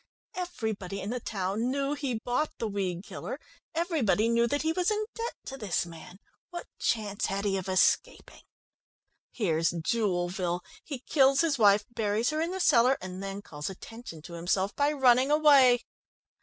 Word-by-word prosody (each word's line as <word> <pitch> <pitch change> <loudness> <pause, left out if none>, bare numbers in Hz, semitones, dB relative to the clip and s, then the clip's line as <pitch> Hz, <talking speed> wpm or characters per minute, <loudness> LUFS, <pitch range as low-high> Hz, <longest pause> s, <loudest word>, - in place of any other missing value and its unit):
Everybody 220 - -4
in 200 +3 -4
the 250 - -2
town 205 +2 -2
knew 275 +1 -1
he 275 -5 -2
bought 250 +5 -1
the 225 - -2
weed 190 -3 -3
killer; - - -6 0.4
everybody 300 - +1
knew 235 0 +3
that 285 +5 -1
he 320 - +1
was 360 +1 +1
in 430 0 0
debt 465 0 -4
to 270 - -6
this 200 -6 -1
man. 170 +1 -11 0.3
What 350 -1 -7
chance 210 -3 -1
had 195 +1 -2
he 195 -1 +1
of 190 -1 -3
escaping? 190 - +1 0.9
Here's 165 -8 +1
Jewelville 175 -1 -1 0.2
he 275 -5 -6
kills 275 -1 +4
his 310 -6 +1
wife, 205 -1 +5
buries 220 +2 0
her 310 +1 -1
in 330 - 0
the 380 +1 -4
cellar, 255 -6 +4
and 185 0 -7
then 195 +1 -5
calls 150 -1 -6
attention 190 -4 -10
to 170 - -10
himself 190 +4 -1
by 285 +1 +2
running 260 -2 +4
away. 280 -5 +6
225 Hz, 170 wpm, -29 LUFS, 190-280 Hz, 0.9 s, away